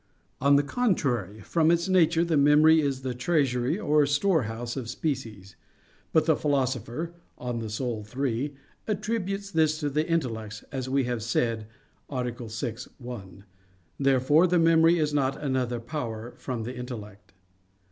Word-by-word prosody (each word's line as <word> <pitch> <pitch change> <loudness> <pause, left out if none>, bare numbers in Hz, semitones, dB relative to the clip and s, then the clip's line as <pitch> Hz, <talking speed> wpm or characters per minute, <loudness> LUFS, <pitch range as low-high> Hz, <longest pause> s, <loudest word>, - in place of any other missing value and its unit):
On 140 +1 +5
the 140 - +4
contrary, 135 - 0
From 165 -2 +2
its 170 +2 +2
nature 170 -2 +4
the 165 -2 +1
memory 150 +2 +6
is 135 -3 -2
the 130 -1 -2
treasury 130 0 +1
or 150 -7 +3
storehouse 130 - 0
of 125 -4 -5
species. 115 - -4 0.6
But 160 -1 +3
the 160 -1 +4
Philosopher 140 +2 -1 0.2
(De - - -14
Anima 115 -3 -3 0.5
iii) 140 +2 -1 0.3
attributes 205 -2 -2
this 155 -3 +2
to 145 -2 -1
the 155 +4 0
intellect, 110 -10 -2
as 130 -2 -4
we 135 0 +2
have 120 -2 -2
said 115 -1 -1 0.4
(A. 125 -3 -2 0.2
6, 115 +2 -4
ad - - -25
1). 100 -7 -9 0.6
Therefore 140 +5 +4
the 180 0 +2
memory 165 0 +5
is 150 -2 0
not 135 -2 0
another 130 -4 -1
power 115 -3 -5
from 125 -4 -4
the 125 +3 -5
intellect. 105 -6 -8
135 Hz, 145 wpm, -27 LUFS, 120-160 Hz, 0.6 s, memory